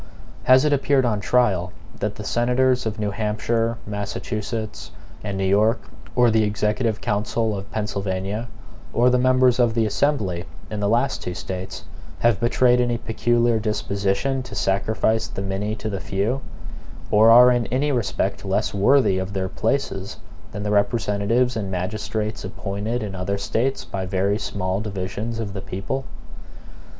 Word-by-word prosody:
Has 130 +2 +6
it 150 - +3
appeared 140 -1 +2
on 110 -3 +1
trial 100 -6 +2 0.3
that 105 0 -2
the 105 - -7
senators 125 +2 +2
of 105 - -3
New 105 -1 -1
Hampshire, 115 +2 -1
Massachusetts, 105 +1 -4 0.3
and 100 -2 -3
New 95 - 0
York, 105 +5 +3 0.4
or 120 -2 +5
the 110 0 +3
executive 105 +2 0
council 110 0 0
of 100 0 -7
Pennsylvania, 100 +1 -2 0.5
or 125 +2 +4
the 125 - +3
members 130 -1 +4
of 120 -2 +3
the 115 -1 +2
Assembly 105 -7 0 0.3
in 105 - -3
the 100 - +1
two - - +1
last 120 +4 +1
States, 95 +1 -6 0.3
have 120 -3 +2
betrayed 125 +1 +3
any 120 -1 +1
peculiar 120 0 +1
disposition 105 +4 -1
to 125 - -9
sacrifice 110 +3 +1
the 95 - -5
many 100 +2 -2
to 110 - -6
the 100 -3 -3
few, 105 +9 -1 0.7
or 110 +2 +6
are 125 +2 +9
in 120 -1 +1
any 140 +4 0
respect 120 -6 -1
less - - 0
worthy 100 -1 +4
of 95 +1 -4
their 95 -1 -1
places 100 -6 -2 0.3
than 100 - -5
the 105 - -1
representatives 105 +3 +1
and 105 -3 -3
magistrates 105 +4 -3
appointed 100 +5 -3
in 100 -2 -5
other 95 +2 -2
States 120 +6 -1
by 95 -1 -4
very 100 +2 0
small 95 -1 -2
divisions 105 +2 -4
of 105 -4 -4
the 95 - -5
people? 105 +9 -4
110 Hz, 155 wpm, -23 LUFS, 100-120 Hz, 0.7 s, are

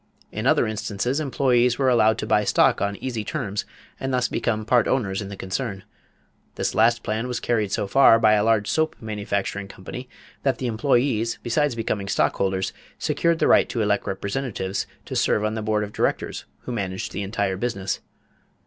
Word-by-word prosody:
In - - -2
other - - +4
instances, 110 +4 -2
employees 125 -4 +2
were 135 - +1
allowed 110 -3 +4
to - - -3
buy 105 - +3
stock - - +3
on 100 0 0
easy 115 -1 -4
terms 100 0 -3 0.3
and 135 - -2
thus 125 -1 +1
become 110 -2 -1
part 120 +1 +3
owners 100 -7 0
in 100 - -6
the 100 - -7
concern. 95 +1 -4 0.7
This - - -1
last 120 +1 +3
plan 110 +3 -2
was 125 -1 -2
carried 110 -5 0
so - - 0
far 115 +2 +6
by 110 -1 +4
a 105 -1 +3
large 110 -2 +2
soap 160 0 +1
manufacturing 100 -2 -3
company 125 +7 -9 0.3
that 135 -4 +1
the 130 - -4
employees, 120 -1 +1
besides 130 +2 +1
becoming 105 -3 -2
stockholders, 95 -1 0 0.2
secured 170 -1 +1
the - - +2
right - - +5
to 115 -4 -1
elect 105 -1 0
representatives 100 -1 -3 0.2
to - - -6
serve 105 - +2
on 110 - 0
the 110 - -3
board 105 0 0
of 105 - -7
directors - - -1 0.2
who - - -6
managed 95 -5 -3
the - - -4
entire 100 -1 -1
business. 100 -2 -2
110 Hz, 185 wpm, -24 LUFS, 100-125 Hz, 0.7 s, far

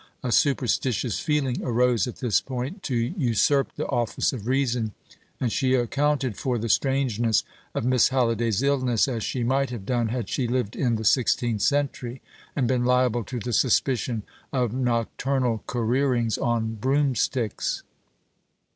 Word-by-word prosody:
A 125 - -1
superstitious 125 -3 +1
feeling 145 -5 0
arose 125 -2 +2
at 125 - -6
this 115 -8 +1
point, 135 - -5
to 130 - -3
usurp 130 - +1
the - - -3
office 120 -1 0
of 115 -4 -6
reason, 125 -5 0 0.5
and 120 -3 0
she 130 +1 +2
accounted 135 0 0
for 125 -2 -1
the 115 +1 -3
strangeness 120 -4 +2 0.3
of - - -1
Miss 125 -2 +4
Halliday's 115 -3 +1
illness 130 -5 +2
as 120 -4 -2
she 125 +3 -2
might 135 +3 +1
have 115 -6 -6
done 120 0 0
had 115 -2 -3
she 125 +3 -1
lived 120 -3 -1
in 120 -4 +1
the 110 0 -4
sixteenth 120 -2 +2
century, 135 -1 0 0.4
and 130 -5 +1
been 125 -1 +1
liable 125 -1 +2
to 130 - -5
the 120 +2 -4
suspicion 120 -2 +1 0.3
of 125 -4 0
nocturnal 125 0 0
careerings 120 -1 +1
on 115 -2 -1
broomsticks. 130 -1 0
125 Hz, 145 wpm, -25 LUFS, 115-130 Hz, 0.5 s, Miss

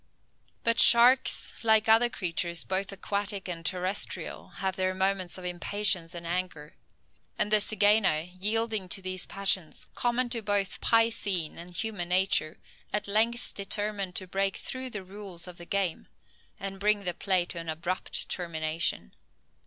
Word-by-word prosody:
But 230 0 +2
sharks, 245 +3 +6
like 220 -1 +3
other 225 +2 +5
creatures 170 -4 -1
both 190 +1 -1
aquatic 200 0 -4
and 170 -2 -5
terrestrial, 185 +4 0
have 190 -1 -3
their 185 0 -2
moments 190 -1 -2
of 185 - -9
impatience 180 -1 0
and 170 0 -8
anger; 170 -4 -4 0.6
and 210 - +2
the 215 - +8
zygaena, 205 -5 +3
yielding 210 0 -1
to 195 - -1
these 185 -1 -2
passions, 190 -4 0
common 245 +1 -1
to 235 -1 +2
both 205 -2 -1
piscine 215 -8 +1
and 175 0 -8
human 205 -6 -3
nature, 180 -3 +2 0.3
at 210 0 0
length 225 +4 +2
determined 200 -2 -2
to 190 - +1
break 195 +1 -1
through 260 0 -3
the 210 -5 -6
rules 190 -2 -4
of 180 -1 -11
the 175 - -10
game, 195 -4 -2 0.5
and 195 0 -6
bring 205 0 +1
the 180 -2 -1
play 185 -1 0
to 175 - -6
an 165 -1 -7
abrupt 170 +4 -3
termination. 160 - -2
195 Hz, 150 wpm, -27 LUFS, 180-210 Hz, 0.6 s, the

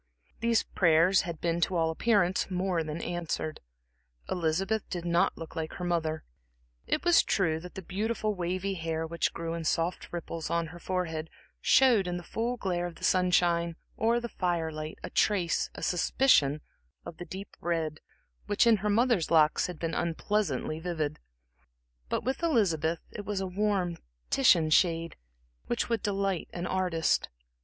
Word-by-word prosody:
These 230 -1 +2
prayers 170 +2 +4
had 165 -2 -5
been 170 0 -1
to 185 - +1
all 165 -1 +2
appearance 190 0 +2
more 180 -2 0
than 155 +1 -5
answered. 170 -2 -3 0.7
Elizabeth 185 +6 0
did 175 -1 -4
not 175 +2 +2
look 165 -1 -9
like 160 -1 -3
her 180 - -6
mother. 160 -3 -1 0.6
It 310 - -1
was 345 -1 +6
true 160 -5 +1
that 180 +2 -11
the 190 - -6
beautiful, 215 +4 -1
wavy 185 +1 -2
hair, 165 -2 -2
which 170 +1 -1
grew 165 0 -4
in 165 0 -4
soft 165 +3 -1
ripples 165 -2 -5
on 170 0 0
her 175 - -10
forehead, 165 -3 -3 0.3
showed 240 -8 +5
in 175 0 -2
the 175 - -7
full 235 +8 -2
glare 175 -4 -1
of 170 - -9
the - - -14
sunshine 175 -2 +2 0.2
or 230 +2 +2
the 240 - -4
firelight 160 -6 -2
a - - -6
trace, 185 -5 +1
a - - -7
suspicion 160 - +3 0.4
of 160 - -8
the 175 - -7
deep 190 +2 -8
red 160 -3 -1 0.5
which 205 +3 +3
in 230 -2 +6
her 210 +2 -2
mother's 225 -4 +2
locks 155 -2 +4
had 180 -2 -7
been 165 0 -3
unpleasantly 165 -3 -1
vivid; 160 -3 -3 0.9
but - - -1
with 260 +5 -2
Elizabeth, 170 - +1
it 205 - -6
was 205 -1 -2
a 190 - -2
warm 185 -2 -1 0.3
Titian 170 -12 +4
shade 165 0 +2 0.5
which 240 - -1
would 230 -1 0
delight 195 -3 -1
an 175 0 -4
artist. 180 -3 +1
175 Hz, 165 wpm, -29 LUFS, 165-195 Hz, 0.9 s, was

